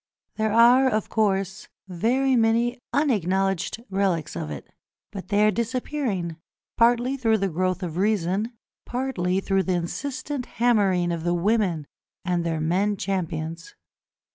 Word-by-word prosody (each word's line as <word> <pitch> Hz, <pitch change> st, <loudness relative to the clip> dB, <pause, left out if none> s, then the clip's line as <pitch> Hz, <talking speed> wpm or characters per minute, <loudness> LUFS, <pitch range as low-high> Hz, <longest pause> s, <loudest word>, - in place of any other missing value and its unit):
There 220 Hz, -1 st, +1 dB
are, 245 Hz, +4 st, +6 dB
of 215 Hz, -3 st, -1 dB
course, 195 Hz, -2 st, 0 dB, 0.2 s
very 250 Hz, +9 st, +1 dB
many 235 Hz, +2 st, +2 dB
unacknowledged 195 Hz, -, 0 dB
relics 190 Hz, -5 st, 0 dB
of 80 Hz, -3 st, -4 dB
it, 75 Hz, -2 st, -7 dB, 0.4 s
but 195 Hz, -2 st, -7 dB
they 210 Hz, 0 st, +3 dB
are 215 Hz, -, +4 dB
disappearing, 235 Hz, -, -2 dB, 0.4 s
partly 240 Hz, +3 st, +3 dB
through 225 Hz, -4 st, +2 dB
the 195 Hz, -1 st, -1 dB
growth 185 Hz, +2 st, -1 dB
of 170 Hz, -2 st, -4 dB
reason, 200 Hz, +2 st, 0 dB, 0.3 s
partly 215 Hz, -8 st, -1 dB
through 195 Hz, 0 st, +1 dB
the 185 Hz, -1 st, 0 dB
insistent 260 Hz, -, -4 dB
hammering 200 Hz, -7 st, +2 dB
of 165 Hz, -1 st, -3 dB
the 175 Hz, 0 st, +1 dB
women 185 Hz, -4 st, +1 dB, 0.4 s
and 175 Hz, -2 st, 0 dB
their 165 Hz, -1 st, -1 dB
men 190 Hz, +6 st, +1 dB
champions. 175 Hz, -, -4 dB
200 Hz, 135 wpm, -24 LUFS, 180-235 Hz, 0.4 s, are